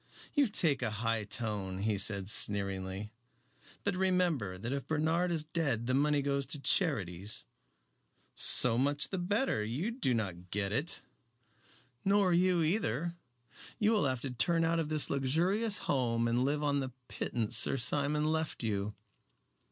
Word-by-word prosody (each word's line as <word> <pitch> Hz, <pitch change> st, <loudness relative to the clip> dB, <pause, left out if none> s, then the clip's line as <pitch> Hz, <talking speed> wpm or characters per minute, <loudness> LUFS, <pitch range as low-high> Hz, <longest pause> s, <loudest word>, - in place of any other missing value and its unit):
"You 290 Hz, -3 st, +3 dB
take 160 Hz, -10 st, +2 dB
a 120 Hz, -, 0 dB
high 110 Hz, 0 st, -1 dB
tone," 100 Hz, -3 st, -4 dB
he 105 Hz, -2 st, 0 dB
said 100 Hz, -1 st, +1 dB
sneeringly. 100 Hz, 0 st, -2 dB, 0.7 s
"But 200 Hz, -2 st, 0 dB
remember 180 Hz, -, 0 dB
that 115 Hz, +7 st, -4 dB
if 140 Hz, -1 st, -4 dB
Bernard 160 Hz, +3 st, +1 dB
is 165 Hz, -3 st, 0 dB
dead 150 Hz, -8 st, -1 dB
the 130 Hz, -, 0 dB
money 145 Hz, +1 st, +2 dB
goes 140 Hz, -1 st, -1 dB
to 140 Hz, -, -3 dB
charities 105 Hz, -, 0 dB, 0.5 s
" -, -, -41 dB, 0.2 s
"So 120 Hz, -1 st, +5 dB
much 145 Hz, +1 st, +1 dB
the 190 Hz, -, -2 dB
better. 200 Hz, -, 0 dB
You 135 Hz, -, -2 dB
do 230 Hz, -, 0 dB
not 90 Hz, -5 st, -4 dB
get 100 Hz, 0 st, -2 dB
it." 140 Hz, +10 st, -1 dB, 1.0 s
"Nor 195 Hz, -2 st, +3 dB
you 180 Hz, -1 st, +3 dB
either. 165 Hz, -, 0 dB, 0.6 s
You 215 Hz, -1 st, +2 dB
will 210 Hz, -9 st, +2 dB
have 130 Hz, -3 st, -1 dB
to 135 Hz, -, -4 dB
turn 165 Hz, +6 st, +2 dB
out 165 Hz, 0 st, +1 dB
of 155 Hz, -2 st, -2 dB
this 155 Hz, -2 st, +2 dB
luxurious 175 Hz, -, +1 dB
home 115 Hz, -4 st, +1 dB
and 120 Hz, +2 st, +1 dB
live 145 Hz, +2 st, 0 dB
on 145 Hz, -1 st, +1 dB
the 130 Hz, -2 st, -4 dB
pittance 115 Hz, -1 st, -2 dB
Sir 135 Hz, -, +4 dB
Simon 145 Hz, +4 st, 0 dB
left 160 Hz, -3 st, -1 dB
you." 105 Hz, -1 st, -2 dB
140 Hz, 160 wpm, -32 LUFS, 110-165 Hz, 1.0 s, So